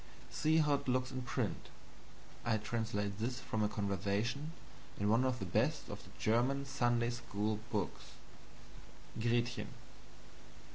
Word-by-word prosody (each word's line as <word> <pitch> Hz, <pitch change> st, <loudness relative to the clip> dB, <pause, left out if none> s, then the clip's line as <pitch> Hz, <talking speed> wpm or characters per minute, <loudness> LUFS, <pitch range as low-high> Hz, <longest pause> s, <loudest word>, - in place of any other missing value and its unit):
See 155 Hz, +1 st, +3 dB
how 150 Hz, -2 st, +5 dB
it 140 Hz, -, 0 dB
looks 130 Hz, 0 st, +2 dB
in 130 Hz, 0 st, -3 dB
print 120 Hz, -1 st, -2 dB, 0.7 s
I 115 Hz, -2 st, +2 dB
translate 105 Hz, -2 st, -1 dB
this 125 Hz, +3 st, -1 dB
from 110 Hz, -4 st, -2 dB
a 105 Hz, -, +3 dB
conversation 105 Hz, -, 0 dB, 0.5 s
in 100 Hz, +1 st, +2 dB
one 115 Hz, +4 st, +5 dB
of 130 Hz, -1 st, +2 dB
the 95 Hz, -, -3 dB
best 90 Hz, -, +1 dB
of -, -, -6 dB
the -, -, -14 dB
German 125 Hz, +5 st, +2 dB
Sunday 120 Hz, -3 st, +2 dB
school 105 Hz, -2 st, -1 dB
books: 100 Hz, -5 st, -2 dB, 1.1 s
"Gretchen. 120 Hz, +1 st, +1 dB
120 Hz, 135 wpm, -36 LUFS, 105-130 Hz, 1.1 s, how